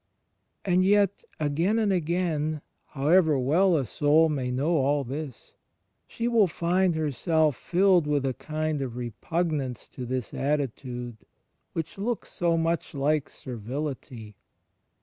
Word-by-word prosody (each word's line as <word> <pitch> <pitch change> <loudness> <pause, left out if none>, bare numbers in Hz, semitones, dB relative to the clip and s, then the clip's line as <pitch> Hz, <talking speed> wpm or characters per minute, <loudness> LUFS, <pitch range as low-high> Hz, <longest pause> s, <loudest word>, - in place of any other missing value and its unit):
And 185 -1 +3
yet, 200 0 +3 0.2
again 160 +8 +1
and 210 -3 +2
again, 160 -3 -1 0.3
however 155 +2 +3
well 165 +8 +3
a 135 - 0
soul 150 - +3
may 135 -4 -2
know 145 +7 +1
all 140 +1 +2
this, 135 0 -7 0.5
she 235 - -3
will 230 -4 +4
find 175 +2 +1
herself 155 0 +1
filled 180 0 +3
with 145 -2 +1
a 130 - 0
kind 155 +1 -3
of 125 -3 -4
repugnance 130 - -3
to 125 -2 -7
this 125 -2 -3
attitude 125 -4 -2 0.6
which 165 +3 -5
looks 230 +3 -3
so 170 -1 +1
much 165 -1 -1
like 145 +1 +1
servility. 125 -2 -6
155 Hz, 130 wpm, -27 LUFS, 135-175 Hz, 0.6 s, will